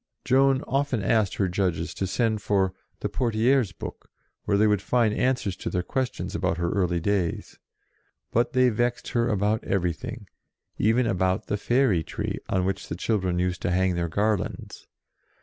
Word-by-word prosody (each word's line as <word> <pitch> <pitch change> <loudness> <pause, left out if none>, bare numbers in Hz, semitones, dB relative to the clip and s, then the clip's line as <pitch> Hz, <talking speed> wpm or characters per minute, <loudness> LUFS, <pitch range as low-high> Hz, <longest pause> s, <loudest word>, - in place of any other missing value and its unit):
Joan 135 +1 +3
often 135 -5 -1
asked 110 -3 +2
her 95 - +1
judges 90 -2 -1
to 95 - -2
send 110 +1 0
for 95 -2 +1 0.3
"the - - 0
Poitiers 115 +2 +1
book," 85 - -9 0.4
where 100 -1 +2
they 105 - +4
would 105 -2 +2
find 115 -1 +2
answers 125 -6 0
to - - -4
their 90 -1 -1
questions 130 +6 -3
about 85 - 0
her 85 0 -1
early 90 -3 +1
days; 90 -1 -2 0.7
but 120 +2 +1
they 130 -1 +5
vexed 120 +2 -1
her 120 0 +1
about 105 +1 +1
everything, 90 -4 -2 0.5
even 115 +3 +3
about 95 -3 0
the - - -1
fairy 120 -4 +2
tree, - - -4
on 95 -1 +1
which 95 0 -2
the - - -4
children 95 -2 0
used 90 0 -1
to - - -1
hang 95 +1 +2
their 85 -1 -1
garlands. 105 +3 -2
105 Hz, 165 wpm, -26 LUFS, 90-120 Hz, 0.7 s, they